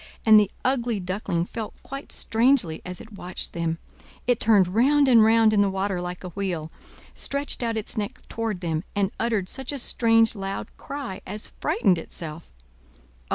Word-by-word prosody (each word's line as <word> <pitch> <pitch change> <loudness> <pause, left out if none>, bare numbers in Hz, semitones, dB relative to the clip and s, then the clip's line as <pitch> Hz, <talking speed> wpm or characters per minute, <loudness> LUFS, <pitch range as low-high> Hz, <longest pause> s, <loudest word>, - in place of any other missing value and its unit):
and 215 -1 +9
the 205 -2 +2 0.2
ugly 240 -4 +1
Duckling 180 -2 -2
felt 220 +2 -6
quite 275 +1 -8
strangely 225 - +2
as 180 0 -6
it 220 - -12
watched 185 -2 -5
them. 165 -1 -1 0.5
It 245 -2 +2
turned 205 -5 +4
round 275 +8 +4
and 235 -4 +7
round 225 0 +5
in 205 - +4
the 200 - +3
water 190 -1 -1
like 180 +1 -6
a 180 - -5
wheel, 175 -4 -3 0.4
stretched 280 -1 0
out 230 -2 -1
its 215 - -4
neck 210 -1 -5
toward 225 -5 -3
them, 165 -2 -1
and 200 -1 +1
uttered 220 -5 0
such 265 +5 -2
a 285 - -4
strange, 225 -2 +3
loud 195 -2 -5
cry 275 -9 -6
as 210 +2 -3
frightened 195 -8 +2
itself. 160 0 -8
210 Hz, 170 wpm, -25 LUFS, 180-230 Hz, 0.5 s, and